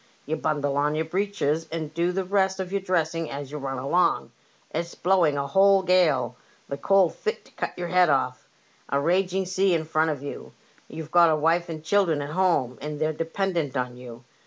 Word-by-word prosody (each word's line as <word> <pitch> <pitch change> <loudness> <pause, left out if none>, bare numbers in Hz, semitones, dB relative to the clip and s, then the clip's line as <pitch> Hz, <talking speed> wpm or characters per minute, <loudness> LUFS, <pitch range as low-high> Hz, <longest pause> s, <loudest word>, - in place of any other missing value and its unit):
You 155 - -1
bundle 145 -3 -1
on 150 +1 +1
your 160 +1 -1
breeches 165 -3 -1
and 160 -2 -4
do 170 +2 +1
the 190 +1 -1
rest 190 0 +1
of 185 -1 -4
your 200 0 -1
dressing 165 -3 -1
as 140 0 -6
you 150 - -5
run 135 -1 -4
along. 145 +8 +1 0.4
It*s 170 +2 -4
blowing 175 -5 +2
a 140 - -1
whole 195 +6 +4
gale, 155 -10 +2 0.3
the 140 - -4
cold 190 +3 +3
fit 440 +2 -4
to - - -20
cut - - -5
your 175 -1 -4
head 180 -2 +4
ofif, 130 -3 +2 0.6
a 140 - +1
raging 185 +4 +1
sea 185 0 +2
in 160 -1 -1
front 160 0 +1
of 145 -3 -4
you. 145 - -8 0.3
You've 160 -1 -8
got 170 -1 +6
a 155 - +3
wife 165 +3 +1
and 155 -2 -6
children 175 -4 +2
at 145 - -6
home, 160 -8 +1
and 150 +1 -5
they're 155 0 0
dependent 165 -3 -2
on 125 -1 -2
you. 125 -1 -11
160 Hz, 205 wpm, -25 LUFS, 145-185 Hz, 0.6 s, got